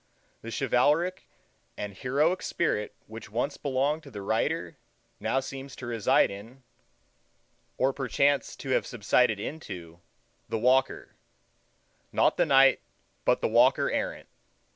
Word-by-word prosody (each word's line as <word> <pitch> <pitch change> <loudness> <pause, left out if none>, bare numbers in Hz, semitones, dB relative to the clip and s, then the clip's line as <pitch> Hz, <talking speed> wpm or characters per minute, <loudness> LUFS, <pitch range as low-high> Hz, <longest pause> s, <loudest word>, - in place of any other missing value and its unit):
The 115 - -8
chivalric 145 +9 +1 0.5
and 105 -1 -5
heroic 150 - +1
spirit 105 -11 -1
which 110 +1 -10
once 125 +7 -2
belonged 140 +3 0
to 145 - -13
the 105 -6 -8
Rider 140 +8 -1 0.6
seems 135 0 -8
now - - -11
to 130 - -7
reside 115 -5 +2
in, 115 +7 -11 1.1
or 135 +1 +2
perchance 140 +2 +1
to 135 - -8
have - - +1
subsided 115 -1 +2
into, 90 - -7 0.5
the - - -1
Walker—not 130 +4 -2
the - - +2
Knight, 135 -1 +5 0.4
but - - +2
Walker - - +4
Errant. - - -3
130 Hz, 120 wpm, -28 LUFS, 115-140 Hz, 1.1 s, Knight